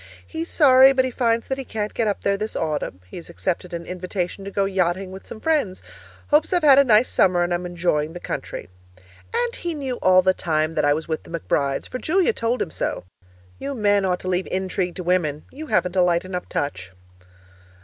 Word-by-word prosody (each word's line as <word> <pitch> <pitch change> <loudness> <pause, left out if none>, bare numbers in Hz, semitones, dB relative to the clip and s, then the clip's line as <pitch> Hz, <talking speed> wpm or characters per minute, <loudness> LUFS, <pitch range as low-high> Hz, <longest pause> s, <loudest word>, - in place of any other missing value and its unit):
He's 325 +1 -5
sorry, 265 -3 +7
but 260 -1 +2
he 260 - -2
finds 230 -2 0
that 265 0 -2
he - - -3
can't 215 -4 -4
get 230 - 0
up 205 - -2
there 200 - +2
this 215 +2 -4
autumn; 150 - -3
he 90 - -10
has 170 - -10
accepted 180 +1 -3
an 170 -1 -5
invitation 185 +1 -4
to 200 - -5
go 200 0 0
yachting 185 -1 -1
with 190 +1 -10
some 220 - -9
friends. 285 -11 0 0.5
Hopes 300 +1 +3
I've 355 -3 +2
had 280 -2 +8
a - - +7
nice 230 -1 +4
summer 180 -2 +3
and 175 0 -1
am 175 +1 -2
enjoying 165 -3 -1
the 175 - -7
country. - - -5 0.6
And 475 +1 -1
he 340 -2 -4
knew 265 -4 -3
all 185 0 +5
the 185 0 +4
time 155 -3 -1
that - - +1
I 145 - +4
was 160 - -5
with 160 -1 -2
the - - -16
McBrides, 140 -3 -1
for 255 - -5
Julia 375 - +2
told 235 - 0
him 160 - -9
so! - - -3 0.6
You 280 0 -4
men 205 -3 +2
ought 180 -1 0
to - - -6
leave 185 0 0
intrigue 185 -1 -2
to 185 - -5
women; 165 -4 0
you 310 +3 -8
haven't 180 -8 +1
a 185 - +4
light 175 0 +2
enough 180 -1 -5
touch. 95 -10 -3
190 Hz, 220 wpm, -23 LUFS, 175-255 Hz, 0.6 s, had